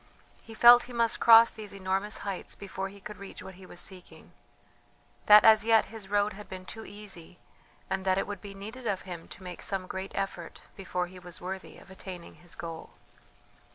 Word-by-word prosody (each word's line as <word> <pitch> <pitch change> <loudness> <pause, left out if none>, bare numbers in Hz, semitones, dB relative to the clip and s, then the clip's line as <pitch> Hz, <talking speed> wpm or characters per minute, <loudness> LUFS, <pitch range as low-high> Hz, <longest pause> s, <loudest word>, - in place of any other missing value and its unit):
He 225 - -12
felt 240 +1 +8
he 245 - -11
must 230 -1 +1
cross 230 0 +8
these 210 -2 -9
enormous 195 +2 -1
heights 195 -2 -5
before 195 -1 -5
he 200 +1 -14
could 210 +2 -9
reach 200 - -10
what 190 - -9
he 185 0 -14
was 175 - -9
seeking; 185 -2 -7 1.0
that 210 0 +9
as 220 -1 +7
yet 225 -1 +4
his 215 -4 -9
road 205 0 +1
had 210 +2 -11
been 185 -1 -8
too 220 +3 -8
easy, 195 -5 -11 0.5
and 190 0 -2
that 190 0 +2
it - - 0
would 205 -2 -7
be 200 -1 -9
needed 225 +5 -8
of 195 -3 -1
him 175 -3 -8
to 190 - -12
make 180 -1 -8
some 195 -2 -2
great 190 +1 -6
effort 195 -4 -4 0.2
before 180 -2 -3
he 180 +1 -12
was 175 -1 -7
worthy 190 +1 -7
of 190 - -16
attaining 185 -2 -9
his 175 -1 -7
goal. 165 -1 -8
195 Hz, 200 wpm, -29 LUFS, 185-210 Hz, 1.0 s, that